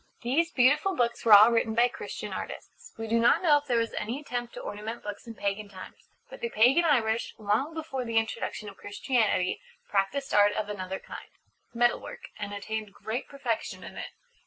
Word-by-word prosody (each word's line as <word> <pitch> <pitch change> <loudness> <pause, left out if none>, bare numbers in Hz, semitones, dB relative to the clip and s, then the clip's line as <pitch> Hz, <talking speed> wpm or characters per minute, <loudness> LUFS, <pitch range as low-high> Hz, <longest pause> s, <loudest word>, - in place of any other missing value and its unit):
These 300 +8 +2
beautiful 290 +9 +3
books 235 -1 0
were 225 - +6
all 210 +3 +10
written 230 -1 +1
by 240 +1 +5
Christian 245 - -7
artists. - - -8
We 225 - -4
do 230 +1 +2
not 230 - +4
know 295 -4 +6
if 290 - -19
there 245 -3 +2
was 230 0 0
any 230 +6 -3
attempt 245 -4 -5
to - - -6
ornament 215 +3 -6
books 205 +3 -7
in 230 - -8
pagan 200 0 -3
times. 185 -2 -12 0.2
But - - -11
the 235 - -1
pagan 250 +10 +4
Irish, 230 -7 +1
long 220 +9 0
before 310 -5 -4
the 230 -1 -1
introduction 225 -1 -2
of 200 - -10
Christianity, 205 -3 0 0.3
practised 210 +8 0
art 205 0 +5
of 210 -1 -3
another 190 -2 -4
kind - - -10 0.5
Metal 240 +1 +3
work - - -9
and 205 -1 -4
attained 210 +1 -4
great 225 +4 -4
perfection 270 -5 -3
in - - -10
it. - - -6
230 Hz, 195 wpm, -28 LUFS, 210-250 Hz, 0.5 s, all